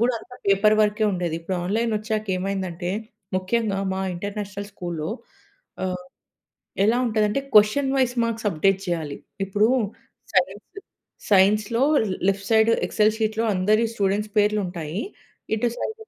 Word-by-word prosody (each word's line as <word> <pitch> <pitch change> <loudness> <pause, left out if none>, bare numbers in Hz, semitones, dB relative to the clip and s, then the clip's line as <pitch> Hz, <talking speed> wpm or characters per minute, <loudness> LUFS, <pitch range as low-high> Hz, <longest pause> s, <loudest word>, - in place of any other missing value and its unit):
కూడా 240 +1 +2
అంతా 250 +3 -13
paper 200 +2 +4
work 210 +1 +1
ఉండేది 175 -3 -2
ఇప్పుడు 185 +2 -3
ఆన్‌లైన్‌ 225 +4 0
వచ్చాక 215 0 -3
ఏమైందంటే, 185 -2 -3 0.5
ముఖ్యంగా 195 +1 0
మా 190 - -2
ఇంటర్నేషనల్ 205 +2 -5
స్కూల్‌లో 170 -3 -4 0.7
ఆహ్, 180 -1 -3 0.8
ఎలా 225 +3 +3
ఉంటుందంటే 215 +2 +1
క్వెషన్ 215 +7 +5
వైస్ 255 -2 +2
మార్క్స్ 225 -1 -2
అప్డేట్ 195 +3 +2
చేయాలి. 160 -5 -2 0.3
ఇప్పుడు 205 +3 +2 0.7
సైన్స్ - - +1 0.7
సైన్స్‌లో 210 +5 +4 0.2
ల్ 185 - -1 0.2
లెఫ్ట్ 200 0 -2
సైడ్ 220 0 +5 0.2
ఎక్సెల్ 215 0 +3
షీట్‌లో 220 0 0
అందరి 210 +4 +2
స్టూడెంట్స్ 205 0 0
పేర్లుంటాయి 190 -5 0 0.5
ఇటు 230 +2 0
సైడ్ 440 - -3
205 Hz, 125 wpm, -24 LUFS, 185-220 Hz, 0.8 s, క్వెషన్